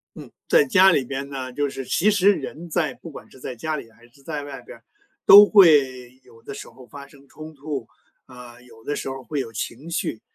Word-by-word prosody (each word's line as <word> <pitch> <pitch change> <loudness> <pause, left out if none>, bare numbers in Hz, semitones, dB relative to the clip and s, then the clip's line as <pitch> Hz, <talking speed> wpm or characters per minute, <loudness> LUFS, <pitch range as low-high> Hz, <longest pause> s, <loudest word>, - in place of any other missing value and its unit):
嗯， - - -12 0.2
在 - - +4
家 190 -6 +5
里 140 - +1
边 140 +1 -6
呢， 130 -2 -6
就 145 0 -2
是 135 -1 -8
其 200 +11 +1
实， 205 0 +3
人 160 +2 -8
在 155 -4 -1
不 165 - -13
管 145 - -13
是 130 - -18
在 125 - -7
家 155 +6 -4
里 115 -6 -10
还 115 +1 -22
是 140 +3 -24
在 150 0 -6
外 145 -1 -9
边 - - -13
儿， - - -25 0.4
都 205 +1 +10
会 135 - +3
有 115 -2 -21
的 - - -9
时 135 - -10
候 130 - -17
发 140 +4 -12
生 140 0 -20
冲 155 +2 -12
突， 140 -4 -6 0.4
啊， 125 -1 -14
有 115 -2 -19
的 145 - -3
时 - - -5
候 135 0 -6
儿 - - -21
会 145 +1 -4
有 120 -4 -6
情 130 +8 -7
绪。 115 -9 -3
140 Hz, 255 characters per minute, -22 LUFS, 125-160 Hz, 0.4 s, 都